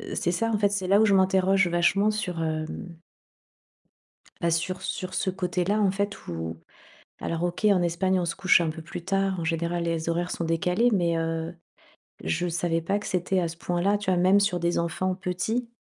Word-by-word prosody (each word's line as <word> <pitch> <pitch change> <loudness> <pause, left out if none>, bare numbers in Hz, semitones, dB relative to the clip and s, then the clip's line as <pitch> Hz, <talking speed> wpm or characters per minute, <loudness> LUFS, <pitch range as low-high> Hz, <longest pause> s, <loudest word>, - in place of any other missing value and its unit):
c'est 175 - 0
ça, 225 +6 0
en 220 - +1
fait, 205 -1 +2
c'est 195 -2 -2
là 200 +2 +5
où 220 - +5
je 205 - +3
m'interroge 190 0 +3
vachement 175 +4 +2
sur, 180 -6 -3
hem 155 -1 -2 1.7
bah 170 - +2
sur 170 +3 -1
sur 185 0 -4
ce - - 0
côté 180 -1 -1
là, 205 +3 +1
en 195 - +3
fait, 200 +1 -3
où 80 -1 -5 0.6
alors 165 0 -3
OK, 175 +4 -1
en 200 -4 +5
Espagne 180 +2 +1
on - - -1
se 170 - -2
couche 185 -1 +5
un 165 - 0
peu 160 +1 -6
plus 165 +1 -8
tard 195 -1 0
en - - -3
général 170 +1 -1
les 165 -1 -1
horaires 175 +2 -1
sont - - -3
décalés 180 +8 +2
mais, 170 -4 +1
heu, 165 +1 -2 0.7
je 80 - -1
savais 165 -1 -1
pas 195 +5 0
que 205 - -8
c'était 185 +1 0
à 170 - -1
ce 165 - -8
point 175 +1 -2
là, 200 +2 +2
tu 200 -2 -2
vois? 180 - +2
Même 190 +3 +5
sur 190 -3 +1
des 170 +1 0
enfants 175 +3 -1
petits 190 +6 -2
180 Hz, 210 wpm, -26 LUFS, 170-195 Hz, 1.7 s, là